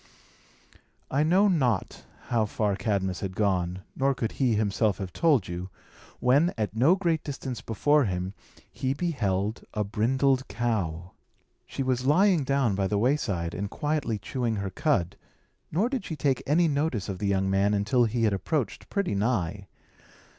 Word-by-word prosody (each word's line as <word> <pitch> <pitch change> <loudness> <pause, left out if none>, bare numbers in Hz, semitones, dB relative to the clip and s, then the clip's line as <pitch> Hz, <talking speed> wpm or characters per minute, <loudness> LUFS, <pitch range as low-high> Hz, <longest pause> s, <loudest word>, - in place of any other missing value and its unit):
I 140 - +2
know 180 +7 +4
not 130 - 0 0.2
how 115 -4 +2
far 105 -1 0
Cadmus 95 -3 -1
had 95 -2 -5
gone, 95 -3 0
nor 135 0 +1
could 115 -2 -2
he 125 -5 +1
himself 105 -1 +1
have 95 -3 -6
told 150 - +2
you, 90 +2 -5 0.5
when, 140 +8 +3
at 105 -2 -2
no 135 +11 +5
great 170 -5 0
distance 130 -5 -5
before 145 +7 +2
him, 90 -1 -3 0.4
he 130 +1 -2
beheld 110 - -1
a 105 - +1
brindled 130 +6 +1
cow. 95 -8 -2 0.6
She 135 - -3
was 130 -1 0
lying 170 +4 +4
down 135 -5 +1
by 95 0 0
the 105 - 0
wayside, 100 - 0
and 100 0 -3
quietly 145 -6 -1
chewing 115 +3 -2
her 100 -2 -3
cud; 100 - 0 0.5
nor 190 +9 +2
did 255 -4 -3
she 160 - -5
take 135 -2 0
any 165 +4 +4
notice 140 -8 -1
of 95 -2 -5
the 105 - -1
young 95 -1 +1
man 100 +2 +2
until 120 +5 +2
he 115 +1 -1
had 105 -2 +3
approached 125 - -2
pretty 200 - -1
nigh. 100 -3 -1
115 Hz, 160 wpm, -27 LUFS, 100-140 Hz, 0.6 s, no